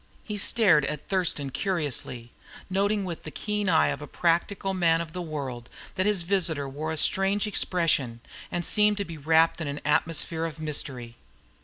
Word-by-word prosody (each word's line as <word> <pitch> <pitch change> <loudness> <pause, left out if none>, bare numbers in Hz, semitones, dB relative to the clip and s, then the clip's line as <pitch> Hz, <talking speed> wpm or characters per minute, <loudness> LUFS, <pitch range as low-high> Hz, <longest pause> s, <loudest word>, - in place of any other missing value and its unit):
He 210 -2 -5
stared 195 -8 +3
at 150 0 -5
Thurston 170 -7 0
curiously, 130 - -2 0.4
noting 200 +1 +1
with 170 -3 -5
the - - -8
keen 210 +4 -2
eye 160 -2 +4
of - - -3
a 150 - -7
practical 180 +5 0
man 165 -3 +3
of 165 -1 -6
the 180 - -4
world 135 -7 -5 0.2
that 185 +2 0
his 205 -4 +2
visitor 165 -6 0
wore 150 +4 -4
a 160 - -3
strange 195 +6 +2
expression, 165 - +1 0.3
and 175 -1 -1
seemed 210 +1 +3
to 200 - -2
be 165 -3 -8
wrapped 160 +3 +3
in 155 - -3
an 145 +1 -4
atmosphere 160 +2 +1
of 160 -1 -6
mystery. 130 -6 -3
165 Hz, 175 wpm, -26 LUFS, 150-190 Hz, 0.4 s, eye